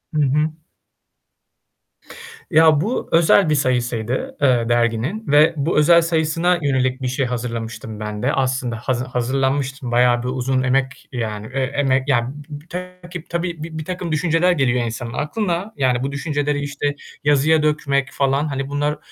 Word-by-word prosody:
Hı 150 Hz, -, +2 dB
hı. 150 Hz, +3 st, +2 dB, 2.0 s
Ya 155 Hz, -2 st, +5 dB
bu 225 Hz, +7 st, -2 dB
özel 165 Hz, +1 st, +5 dB
bir 150 Hz, -, +3 dB
sayısıydı, 120 Hz, -3 st, -1 dB
eee, 125 Hz, -4 st, +3 dB
derginin 120 Hz, -, 0 dB
ve 150 Hz, +3 st, +5 dB
bu 150 Hz, +4 st, 0 dB
özel 170 Hz, +3 st, +6 dB
sayısına 165 Hz, +2 st, +1 dB
yönelik 130 Hz, -2 st, 0 dB
bir 130 Hz, -, -1 dB
şey 130 Hz, +2 st, -1 dB
hazırlamıştım 115 Hz, -3 st, -5 dB
ben 105 Hz, -1 st, -5 dB
de. -, -, +1 dB
Aslında 130 Hz, -2 st, -1 dB
hazı 120 Hz, +2 st, -2 dB
hazırlanmıştım, 130 Hz, +1 st, -1 dB
bayağı 120 Hz, 0 st, +3 dB
bir -, -, -3 dB
uzun 130 Hz, +1 st, 0 dB
emek 130 Hz, 0 st, -1 dB
yani, 110 Hz, -4 st, -4 dB
eee, 135 Hz, -, 0 dB
emek 135 Hz, -1 st, +1 dB
yani 120 Hz, -3 st, +2 dB, 0.2 s
b 145 Hz, -1 st, -8 dB
b 165 Hz, -, -26 dB
takip 180 Hz, -1 st, -8 dB
tabii 170 Hz, -2 st, -3 dB
bir 160 Hz, 0 st, -7 dB
birtakım 175 Hz, +2 st, -4 dB
düşünceler 165 Hz, +3 st, +2 dB
geliyor 130 Hz, -7 st, +1 dB
insanın 115 Hz, +1 st, -5 dB
aklına 180 Hz, -, -2 dB
yani 130 Hz, -2 st, +1 dB
bu 135 Hz, -, -2 dB
düşünceleri, 145 Hz, 0 st, -1 dB
işte, 145 Hz, 0 st, -2 dB, 0.3 s
yazıya 145 Hz, +2 st, +3 dB
dökmek 140 Hz, -3 st, 0 dB
falan, 140 Hz, +2 st, 0 dB
hani, 135 Hz, -1 st, -3 dB
bunlar 145 Hz, +1 st, -1 dB
140 Hz, 155 wpm, -20 LUFS, 125-155 Hz, 2.0 s, özel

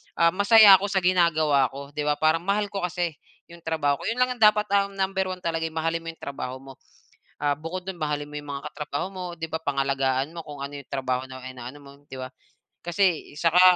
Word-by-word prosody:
ah, 170 Hz, 0 st, +4 dB
masaya 200 Hz, +1 st, +8 dB
ako 200 Hz, -, -2 dB
sa 195 Hz, -1 st, 0 dB
ginagawa 160 Hz, -6 st, +3 dB
ko, 140 Hz, 0 st, -8 dB
'di 150 Hz, 0 st, -3 dB
ba? 150 Hz, -, +3 dB
Parang 155 Hz, +2 st, +2 dB
mahal 205 Hz, +1 st, 0 dB
ko 195 Hz, -3 st, -2 dB
kasi 175 Hz, -1 st, -2 dB, 0.4 s
'yong 170 Hz, -, -12 dB
trabaho 145 Hz, -3 st, +1 dB
ko, -, -, -5 dB
'yon 225 Hz, -, 0 dB
lang 250 Hz, 0 st, +1 dB
yung 225 Hz, -, +1 dB
dapat, 210 Hz, 0 st, +6 dB
ah, 200 Hz, 0 st, +3 dB
number 190 Hz, -1 st, -1 dB
1 185 Hz, -1 st, -5 dB
talaga, 165 Hz, -1 st, -1 dB
eh, 160 Hz, -, -10 dB
mahalin 165 Hz, +1 st, 0 dB
mo -, -, -10 dB
'yong -, -, -21 dB
trabaho 130 Hz, -2 st, -5 dB
mo. 135 Hz, 0 st, -12 dB, 0.6 s
Ah, 145 Hz, -1 st, +1 dB
bukod 165 Hz, +5 st, -6 dB
do'n, 190 Hz, -2 st, -5 dB
mahalin 150 Hz, -1 st, -2 dB
mo -, -, -13 dB
'yong 145 Hz, 0 st, -11 dB
mga 140 Hz, 0 st, -5 dB
katrabaho 150 Hz, 0 st, -3 dB
mo, 185 Hz, -1 st, -6 dB
'di 165 Hz, -, -3 dB
ba, 160 Hz, -, -3 dB
pangalagaan 135 Hz, 0 st, 0 dB
mo 170 Hz, -, -6 dB
kung 145 Hz, -3 st, -10 dB
ano 145 Hz, +1 st, -8 dB
'yong 140 Hz, -, -27 dB
trabaho 130 Hz, -1 st, -2 dB
na 130 Hz, -1 st, -9 dB
inaano 130 Hz, +1 st, -8 dB
mo, 140 Hz, -1 st, -13 dB, 0.2 s
'di 135 Hz, -, -8 dB
ba? 130 Hz, -, -5 dB, 0.5 s
Kasi, 175 Hz, -2 st, 0 dB
eh, -, -, -12 dB
saka, 170 Hz, +2 st, +4 dB
160 Hz, 235 wpm, -25 LUFS, 140-185 Hz, 0.6 s, masaya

